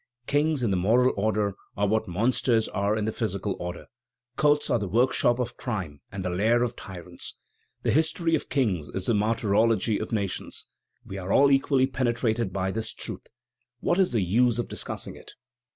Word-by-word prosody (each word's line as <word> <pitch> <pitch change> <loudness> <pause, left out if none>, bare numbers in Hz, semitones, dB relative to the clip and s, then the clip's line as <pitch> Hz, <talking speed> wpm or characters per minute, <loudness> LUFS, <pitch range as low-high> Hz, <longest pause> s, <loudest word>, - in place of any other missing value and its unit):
Kings, 145 0 +1
in 110 - +1
the 95 - +2
moral 120 +8 +3
order, 105 0 0 0.2
are 105 - +2
what 110 +1 +1
monsters 115 +4 +1
are 100 +2 0
in 105 - -1
the 110 - 0
physical 100 -3 -2
order. 90 0 -6 0.5
Courts 150 +1 +3
are 120 - +3
the 100 - -3
workshop 120 +3 +3
of 120 -1 -3
crime 90 - -4
and 95 -1 -5
the 90 - -1
lair 110 +7 +2
of 120 0 -2
tyrants. 90 -2 -9 0.5
The - - +2
history 160 +2 +1
of 160 - 0
kings 100 - 0
is 95 -1 -3
the 120 - +2
martyrology 110 0 +2
of 110 - -5
nations; 100 -4 -3 0.4
we 95 - -6
are 95 +1 -4
all 140 +4 +5
equally 135 -1 +3
penetrated 120 -4 0
by 95 0 -1
this 110 +2 -3
truth. - - -7 0.5
What 175 - +1
is 190 - +3
the 115 -4 +1
use 115 +6 +3
of 120 - -2
discussing - - -5
it?" - - -13
110 Hz, 185 wpm, -26 LUFS, 100-125 Hz, 0.5 s, all